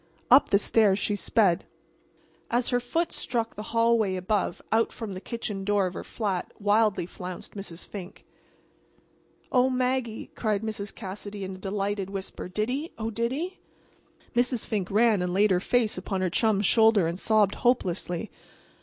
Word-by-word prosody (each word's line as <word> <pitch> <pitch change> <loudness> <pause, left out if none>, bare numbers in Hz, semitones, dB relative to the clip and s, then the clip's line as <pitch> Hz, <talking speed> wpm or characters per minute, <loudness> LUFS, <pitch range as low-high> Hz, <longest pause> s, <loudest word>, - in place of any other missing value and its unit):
Up 265 +3 +7
the 200 - +5
stairs 205 -1 +3
she 205 0 -1
sped. 200 -3 +2 0.9
As 240 +1 +1
her 245 - +2
foot 325 +8 -1
struck 230 -2 -2
the 210 - -7
hallway 230 -4 +2
above 185 0 -1
out 225 +1 +3
from 220 -4 -6
the 185 - -7
kitchen 210 -4 -4
door 205 -1 +2
of 180 - -3
her - - -6
flat 195 -5 -3
wildly 210 -2 +2
flounced 180 0 -8
Mrs. 190 -4 -7
Fink. 190 -3 -9 1.3
"Oh, 255 0 +4
Maggie," 250 -3 -1
cried 215 -2 -1
Mrs. 210 -2 -4
Cassidy, 205 0 -7
in 190 0 -5
a 185 - -10
delighted 195 0 -2
whisper; 195 -2 -6
"did 215 +5 -1
he? 290 +6 -3
Oh, 225 0 -3
did 235 +2 -1
he?" 345 +8 -4 0.8
Mrs. 245 -1 +2
Fink 205 -5 -2
ran 215 -1 +3
and 180 0 -1
laid 205 +1 +4
her 180 - +4
face 220 0 +1
upon 190 0 -3
her 185 -2 0
chum's 210 0 +2
shoulder 220 -3 +5
and 170 +2 -2
sobbed 210 -2 +3
hopelessly. 190 -5 0
210 Hz, 165 wpm, -27 LUFS, 190-230 Hz, 1.3 s, Up